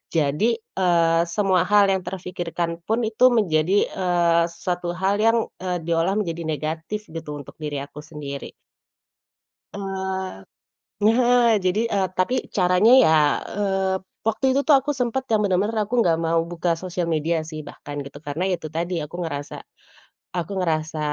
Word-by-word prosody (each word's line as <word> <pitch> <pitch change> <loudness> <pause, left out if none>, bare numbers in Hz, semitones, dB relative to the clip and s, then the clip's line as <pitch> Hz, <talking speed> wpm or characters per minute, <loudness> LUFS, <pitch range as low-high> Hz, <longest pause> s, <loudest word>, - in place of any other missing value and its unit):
jadi, 160 +10 +2
eee, 170 -6 +1
semua 185 -1 +1
hal 205 -1 +5
yang 190 -1 +1
terpikirkan 175 -2 -4
pun 225 +2 +1
itu 225 +3 +4
menjadi, 190 -6 +2
eee, 175 -2 +2
suatu 175 0 -4
hal 190 +3 0
yang, 225 +2 +4 0.2
eee, 180 -2 -3
diolah 170 +3 +1
menjadi 170 -5 -2
negatif 160 +7 -3
gitu, 160 -2 -6
untuk 145 - -12
diri 145 -3 -4
aku 145 +1 -11
sendiri. 145 -2 -7 1.2
Eee, 190 - -4 0.6
nah 240 +2 +4 0.2
jadi 185 +3 +2
eee, 195 -2 +2
tapi 215 +8 +2 0.2
caranya 180 +4 +4
ya, - - +4 0.4
eee, 195 -2 0 0.3
waktu 225 +4 0
itu 270 - +2
tuh 300 - +7
aku 290 +3 -2
sempet 250 +2 0
yang 220 - +4
benar-benar 205 +3 +1
aku 245 - -2
nggak 165 -2 +2
mau 165 0 +2
buka 170 0 0
sosial 180 0 -3
media 165 +1 0
sih, 155 -1 -6
bahkan 145 0 -9
gitu, 140 +1 -11
karena 150 +5 -2
ya - - +2
itu 160 - -6
tadi, 175 +2 -2
aku 150 +2 -6
ngerasa 145 -3 -5 0.8
aku 175 0 -3
ngerasa, 155 -3 -1
180 Hz, 155 wpm, -23 LUFS, 165-205 Hz, 1.2 s, tuh